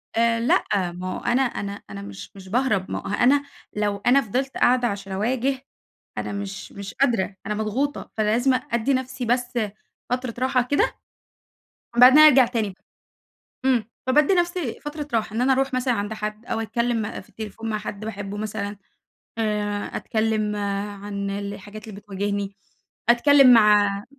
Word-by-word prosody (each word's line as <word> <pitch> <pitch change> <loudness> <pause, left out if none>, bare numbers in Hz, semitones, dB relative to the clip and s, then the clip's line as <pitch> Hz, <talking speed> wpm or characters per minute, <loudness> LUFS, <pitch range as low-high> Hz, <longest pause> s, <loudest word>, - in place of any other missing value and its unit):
آآ 230 0 +3
لأ 200 -6 +1
ما 185 +1 -5
هو - - -6
أنا 245 +2 +2
أنا 205 -6 -2 0.2
أنا 100 -1 -7
مش 100 -1 -9
مش 190 -1 -12
باهرب 215 -5 0
ما - - -2
هو - - -9
أنا 270 +6 +4 0.3
لو 205 -1 -1
أنا 270 +3 +5
فضلت 260 +5 -3
قاعدة 250 0 +3
عشان 200 -2 -5
أواجه 255 +6 0 0.6
أنا - - -3
مش 200 -2 -6
مش 200 0 -8
قادرة، 230 -8 +1
أنا 210 - -1
مضغوطة، 235 +7 -2
فلازم 230 +5 +2 0.2
أدّي 235 +4 +1
نفْسي 260 -1 -2
بس 245 +1 0 0.5
فترة 250 -1 -2
راحة 255 0 +2
كده، 285 +4 +1 1.0
وبعدين 255 +4 +9
أرجع 285 -4 +8
تاني، 225 -5 -2 0.9
إمم، 240 -5 +2 0.2
فبادّي 295 +7 +4
نفْسي 350 -7 -1
فترة 295 0 -6
راحة، 220 -1 -1
إن 235 - 0
أنا 265 +1 +4
أروح 270 0 0
مثلًا 255 0 +1
عند 205 -1 -2
حد 215 +1 -5
أو 225 - -2
أتكلّم 230 -1 -1
في - - -21
التليفون 220 +1 -7
مع 215 - -1
حد 210 0 -6
باحبه 205 -2 -5
مثلًا، 205 -1 -4 0.6
آآ 210 -2 -1
أتكلّم 215 -1 0 0.5
عن 200 -1 -4
الحاجات 205 +2 -7
اللي 205 -2 -8
بتواجهني، 200 0 -3 0.5
أتكلّم 265 +1 +7
مع 205 -3 +5
225 Hz, 155 wpm, -23 LUFS, 205-255 Hz, 1.0 s, وبعدين